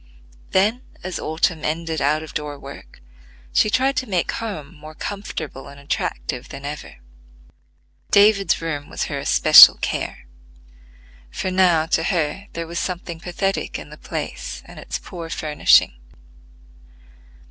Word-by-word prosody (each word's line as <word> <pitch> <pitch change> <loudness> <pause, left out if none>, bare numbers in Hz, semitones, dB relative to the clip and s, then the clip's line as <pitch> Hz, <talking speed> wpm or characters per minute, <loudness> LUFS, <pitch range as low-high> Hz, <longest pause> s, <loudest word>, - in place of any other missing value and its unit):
Then, 215 +6 +2 0.2
as 185 0 -4
autumn 160 0 -1
ended 160 +1 -2
out 150 +2 +1
of 155 - -10
door 150 -1 -4
work, 100 - -12 0.5
she - - +4
tried 265 +5 +2
to 260 - -2
make 180 -3 0
home 195 -11 -6
more 155 -1 -12
comfortable 160 -10 -6
and 140 0 -12
attractive 135 -3 -4
than 140 - -9
ever. 150 +1 -7 1.1
David's 200 -3 +4
room 145 -3 -4
was - - -3
her - - -3
especial - - +9
care; - - -4 1.0
for 185 - -3
now 180 -4 +3
to 160 0 +1
her 170 +2 -1
there 165 0 -4
was 170 +1 -4
something 175 -2 -4
pathetic 195 +3 -2
in - - -10
the - - -9
place - - -6
and - - -12
its - - -4
poor 170 -3 -9
furnishing. 150 - +3
165 Hz, 135 wpm, -21 LUFS, 150-190 Hz, 1.1 s, especial